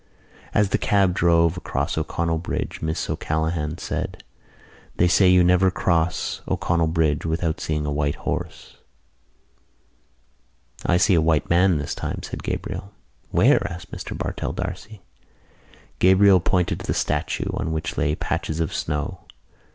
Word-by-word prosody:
As 105 -2 +2
the - - +1
cab 100 -3 +2
drove 85 -1 +3
across 70 -5 -2
O'Connell 80 +1 -1
Bridge 85 - -4
Miss 80 +1 -2
O'Callaghan 80 0 -2
said: - - -4 0.7
"They 90 - +4
say 90 +1 +5
you 90 -1 +6
never 90 +2 +4
cross 85 -2 0
O'Connell 85 -1 +1
Bridge 80 -3 +1
without 80 0 -1
seeing 75 -1 -2
a 75 - -2
white 70 0 0
horse." - - -5 2.1
"I 90 - +4
see 95 +2 +4
a 85 - +4
white 80 -1 +1
man 90 0 +4
this 75 -1 -3
time," - - -5
said - - -6
Gabriel. 100 +1 -5 0.4
"Where?" - - +4
asked 85 +1 -9
Mr - - -6
Bartell - - -3
D'Arcy. 95 +3 -6 1.0
Gabriel 95 +1 +6
pointed 90 0 0
to - - -8
the - - 0
statue, - - -1
on 80 - -2
which 80 -1 -3
lay 75 - +1
patches 80 0 -3
of 80 - -1
snow. 75 +5 -3
85 Hz, 145 wpm, -23 LUFS, 80-90 Hz, 2.1 s, you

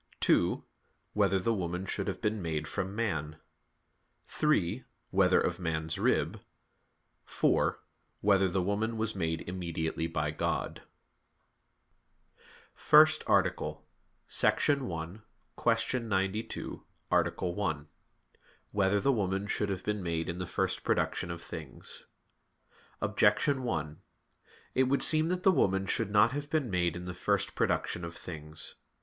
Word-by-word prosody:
(2) - - +3 0.5
Whether 100 -2 +3
the 105 +5 +1
woman 90 -2 -3
should 100 +1 -3
have 95 - -3
been 105 -1 0
made 80 -3 -2
from 95 +3 -3
man? 80 -9 -2 0.9
(3) 130 - 0 0.3
Whether - - +4
of - - -1
man's 80 -2 -2
rib? - - +1 0.8
(4) - - +1 0.4
Whether 100 -1 +4
the 90 +1 0
woman 110 +4 -1
was 110 0 -1
made 80 -3 -1
immediately 85 -3 -2
by 75 -2 -1
God? 75 - -2 1.6
_______________________ - - -34 0.3
FIRST 155 +1 +6
ARTICLE - - +1 0.6
[I, - - +7
Q. 100 - -1 0.8
92, 105 -1 -3 0.3
Art. - - +2
1] 85 -5 -2 0.8
Whether 100 0 +2
the 140 - +3
Woman 95 -4 0
Should 100 0 -1
Have 95 -2 -3
Been 105 -1 -2
Made 85 -2 -2
in 85 +1 -4
the 90 - -3
First - - -1
Production 85 - 0
of 85 0 -6
Things? - - -6 0.9
Objection 140 -2 +2
1: 80 -11 -3 0.7
It 130 - +3
would 140 +2 +2
seem 155 0 +6
that 180 +1 -1
the 190 - +6
woman 95 - +2
should 95 - 0
not 105 +3 +5
have 145 +1 -4
been 150 -8 0
made 85 -2 +1
in 90 0 -6
the 90 - -5
first 90 - 0
production 85 - 0
of 85 0 -6
things. 80 -2 -6
95 Hz, 130 wpm, -31 LUFS, 85-110 Hz, 1.6 s, I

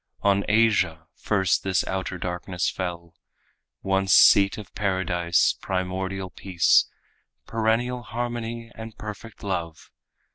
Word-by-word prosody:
On 100 0 +3
Asia 100 -7 +2
first 95 -4 +1
this 95 -2 0
outer 95 -1 -3
darkness 90 0 -3
fell, 85 -2 -5 0.7
Once 95 0 +1
seat 100 0 +6
of 105 -4 -10
paradise, 95 -3 +1
primordial 95 0 -3
peace, 90 -1 +2 0.6
Perennial 115 +2 0
harmony 120 0 -5
and 110 -1 -10
perfect 105 +1 -9
love. 85 -5 -4
95 Hz, 105 wpm, -25 LUFS, 90-110 Hz, 0.7 s, seat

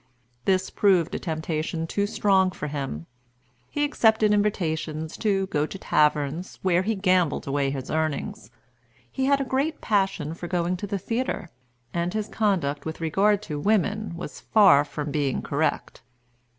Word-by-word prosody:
This 185 -1 +1
proved 185 -5 +3
a - - -2
temptation 160 0 -3
too 200 +5 -1
strong 195 -3 +3
for 165 - -6
him. 135 - -4 0.6
He 290 - -1
accepted 220 -7 +3
invitations 160 -6 -1
to 195 -3 +1
go 150 -4 -1
to 195 - -7
taverns, 150 0 +1
where 180 -1 +3
he 220 +4 -1
gambled 185 -5 +2
away 140 0 0
his 135 -2 -5
earnings. 155 -8 -2 0.6
He 265 - -1
had 280 0 +3
a - - 0
great 280 +4 -1
passion 195 -7 0
for 175 +1 -7
going 175 0 0
to 205 - -5
the 200 - -2
theatre; 230 -3 -3 0.4
and 175 +3 -1
his 215 -1 -1
conduct 170 -10 0
with 160 0 -5
regard 195 +6 +2
to 150 -7 -4
women 210 +1 0
was 180 - -7
far 195 -10 +5
from 145 0 -5
being 140 -3 -1
correct. - - -1
180 Hz, 155 wpm, -25 LUFS, 155-205 Hz, 0.6 s, far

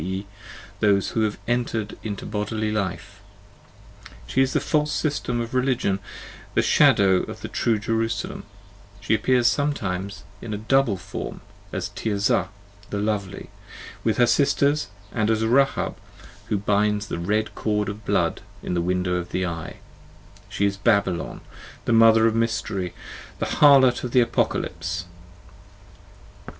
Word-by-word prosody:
e., 95 +3 -3 0.5
those 100 -2 +3
who 110 - -1
have 110 -1 0
entered 120 -3 -1
into 105 -3 -5
bodily 105 +1 -2
life: 100 0 -4 1.0
she 130 - +1
is 135 0 +2
the 155 - +3
false 150 +2 0
system 145 -6 -1
of 115 +1 -4
religion, 125 -6 +1 0.6
the - - +4
shadow 95 -2 +5
of - - -5
the - - -5
true 115 -2 +1
Jerusalem: 115 +1 -2 0.6
she 100 - 0
appears 120 +3 +2
sometimes 100 -9 -1 0.2
in 110 -3 -4
a - - -3
double 115 -1 +2
form, 95 +3 -7 0.3
as 95 -1 -3
Tirzah 100 -3 0 0.4
the 105 - -3
lovely 100 -2 -3 0.5
with - - +1
her 120 - +5
sisters, 140 0 +2 0.2
and 110 -2 0
as 110 0 +1
Rahab, 135 +4 +2 0.5
who 105 - 0
binds 105 +1 +1
the 90 - -4
red 105 +4 -1
cord 105 0 -1
of 105 +2 -6
blood - - 0 0.2
in - - -3
the 85 - +1
window 90 0 0
of 90 0 -5
the 95 - -1
eye: 85 -2 -6 0.7
she 100 0 0
is 100 0 0
Babylon, 100 -3 0 0.4
the 120 - +1
mother 115 0 +6
of 115 - +3
mystery, 115 -5 -1 0.4
the - - -2
harlot 135 -4 +5
of 125 - -4
the 125 - +6
Apocalypse. 85 -7 -1
105 Hz, 140 wpm, -24 LUFS, 100-120 Hz, 1.0 s, mother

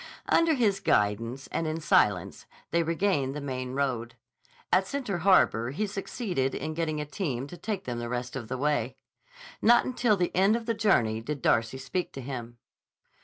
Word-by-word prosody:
Under 330 -2 +4
his 210 -6 +2
guidance 115 +6 0
and 165 - -1
in 155 +1 -2
silence 100 - +2 0.2
they 170 - +3
regained 165 -5 0
the - - -3
main 130 -2 -4
road. 120 -4 -1 0.6
At 190 +1 +4
Center 245 -10 -3
Harbor 160 - +4
he 170 +11 -2
succeeded 195 - -2
in 155 - -3
getting 155 -2 -2
a 150 - -3
team 145 - -3
to 145 - -9
take 200 +1 -4
them 120 -5 -4
the 120 0 -4
rest 125 +1 -4
of 120 -4 -5
the 130 +3 -3
way. 135 -2 0 0.6
Not 240 +2 +5
until 240 -4 +2
the 180 -1 -1
end 195 +4 +4
of 230 -1 -3
the 230 - 0
journey 120 - +2
did 145 +2 -5
Darcy 115 +3 +2
speak 135 +7 -3
to 135 - -6
him. 120 -3 -6
145 Hz, 180 wpm, -28 LUFS, 125-195 Hz, 0.6 s, Not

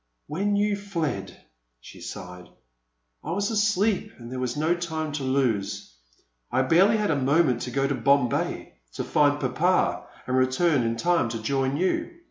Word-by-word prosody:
When 200 +7 -1
you 205 0 +2
fled," 165 - -4 0.4
she - - -13
sighed, 90 -1 -8 0.7
I 160 - -3
was 200 +4 -1
asleep 210 -1 +1
and 120 0 -10
there 130 - -4
was 125 +2 -2
no 160 +3 +2
time 160 -3 -3
to 145 -1 -4
lose. 125 - -1 0.6
I 130 +2 +2
barely 190 +10 +4
had 210 -5 0
a - - +2
moment 140 -2 +2
to - - -4
go 135 +2 0
to 140 - 0
Bombay, 135 0 +1 0.2
to - - -3
find 145 0 +2
Papa, 155 +8 +1 0.2
and 130 - -1
re 130 0 +4
turn 145 +2 +2
in 115 0 -1
time 170 -7 +1
to 115 0 -4
join 135 +3 0
you. 185 - -1
145 Hz, 170 wpm, -25 LUFS, 130-175 Hz, 0.7 s, barely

